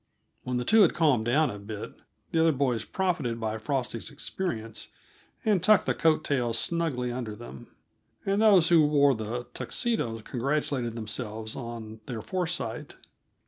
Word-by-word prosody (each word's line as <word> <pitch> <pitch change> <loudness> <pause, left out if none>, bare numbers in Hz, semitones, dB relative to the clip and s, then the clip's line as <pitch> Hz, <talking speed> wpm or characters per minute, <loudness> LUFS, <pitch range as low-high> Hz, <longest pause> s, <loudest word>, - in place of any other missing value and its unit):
When 125 -1 -2
the 125 - -2
two 220 0 +6
had 185 - +5
calmed 145 -9 +3
down 145 +6 +3
a 105 - -7
bit, 105 +1 -7 0.4
the 165 - +2
other 165 0 +5
boys 130 -6 0
profited 165 -12 -1
by 110 -1 -2
Frosty's 120 -1 -2
experience, 140 - -4 0.6
and 205 -5 +3
tucked 215 0 +5
the - - +1
coat 155 -1 +2
tails 120 -6 0
snugly 145 -6 -1
under 120 -4 -4
them 105 - -10 0.6
and 195 +2 +1
those 195 -7 +6
who 165 -3 +6
wore 145 -2 +4
the 115 +2 -4
Tuxedos 120 - -2
congratulated 130 -2 -1
themselves 110 -1 -5
on 115 -3 -7
their 115 -4 -5
foresight. 175 -11 -3
125 Hz, 150 wpm, -28 LUFS, 115-160 Hz, 0.6 s, two